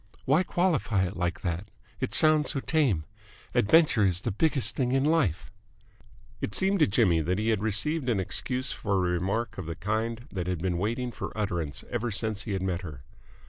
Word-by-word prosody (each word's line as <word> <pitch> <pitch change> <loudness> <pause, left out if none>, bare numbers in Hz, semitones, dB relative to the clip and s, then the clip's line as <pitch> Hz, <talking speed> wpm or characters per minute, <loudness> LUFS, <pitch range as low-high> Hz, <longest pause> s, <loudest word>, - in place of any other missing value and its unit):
"Why 145 +6 +4
qualify 165 - +1
it 90 +3 -5
like 85 0 -2
that? 85 +3 -3 0.3
It - - -2
sounds 155 -1 +5
so 140 - +1
tame. 135 - +1 0.5
Adventure 145 -1 +4
is 90 -2 +3
the 115 - -2
biggest 140 +4 +1
thing 125 -1 0
in 135 0 +2
life." 105 - +1 0.9
It 105 - -3
seemed 195 +1 +2
to 155 - +5
Jimmy 95 -6 +3
that 90 +4 -1
he 110 +2 0
had 110 -3 +1
received 125 +7 0
an 110 -5 +1
excuse 125 +7 -2
for 100 -2 -2
a 90 -2 +1
remark 95 +6 -2
of 85 -3 -6
a 85 - -4
kind 110 +5 -2
that 90 -2 -4
had 90 -1 -1
been 90 0 -1
waiting 120 +5 -2
for - - -6
utterance 85 -8 -2
ever 120 0 -1
since 110 -1 -1
he 105 - -3
had 95 -1 -2
met 90 -2 -1
her. 75 -8 -9
105 Hz, 195 wpm, -28 LUFS, 90-130 Hz, 0.9 s, sounds